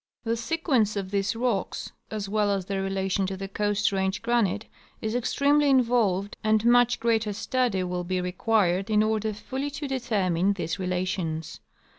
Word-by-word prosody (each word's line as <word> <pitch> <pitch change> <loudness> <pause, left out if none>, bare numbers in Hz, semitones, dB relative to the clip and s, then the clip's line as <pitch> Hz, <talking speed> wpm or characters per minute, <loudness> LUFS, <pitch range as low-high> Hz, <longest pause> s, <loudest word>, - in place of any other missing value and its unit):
The 230 0 0
sequence 235 - 0
of 195 -2 -4
these 200 +1 0
rocks, 230 -5 -2 0.2
as 210 -2 -4
well 210 0 +1
as 195 -2 0
their 195 0 -2
relation 195 0 -1
to 190 0 -4
the 195 +1 -5
Coast 205 +1 0
Range 190 0 0
granite, 220 -3 +1 0.3
is 220 0 -3
extremely 280 +4 +2
involved, 230 -7 +2
and 215 0 +2
much 245 0 +5
further 225 -2 +1
study 235 -3 0
will 180 0 -3
be 185 +1 -1
required 185 +1 +1
in 215 0 +4
order 220 0 0
fully 265 +7 -4
to 290 0 -5
determine 200 -8 +1
these 175 -2 -3
relations. 180 -3 -2
205 Hz, 160 wpm, -26 LUFS, 190-235 Hz, 0.3 s, much